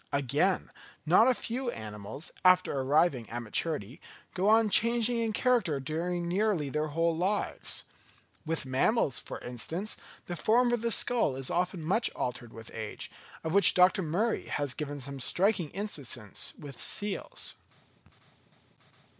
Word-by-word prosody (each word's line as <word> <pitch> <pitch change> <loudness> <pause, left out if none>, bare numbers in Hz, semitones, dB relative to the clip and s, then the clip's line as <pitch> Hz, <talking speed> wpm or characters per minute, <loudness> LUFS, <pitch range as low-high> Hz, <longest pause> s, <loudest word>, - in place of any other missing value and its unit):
Again, 145 +7 +1 0.3
not 180 +9 +6
a 255 - +4
few 245 +3 -3
animals, 105 - -6
after 185 0 +5
arriving 140 -1 +2
at 120 +1 -4
maturity, 130 - -2 0.3
go 190 +3 +1
on 220 -1 +4
changing 235 +2 +3
in 225 -1 0
character 215 - +1
during 170 +5 -2
nearly 185 -5 0
their 150 +2 -1
whole 165 +2 0
lives. 190 +5 -1 0.6
With 160 -2 -1
mammals, 135 - +2
for - - -7
instance, 160 - -3 0.3
the 175 - -5
form 240 +6 +3
of 240 - 0
the 235 0 0
skull 230 - +2
is 135 -1 -2
often 180 -1 -1
much 200 +9 +2
altered 125 -2 -4
with 115 -1 -10
age, 110 -2 -5 0.3
of 160 - -2
which 200 0 +5
Dr. 185 +2 +5
Murie 190 +8 -1
has 145 -3 -1
given 145 0 -5
some 140 +1 -5
striking 185 - +2
instances 140 - -2
with 140 -5 -9
seals. 205 -1 -1
170 Hz, 140 wpm, -30 LUFS, 135-210 Hz, 0.6 s, not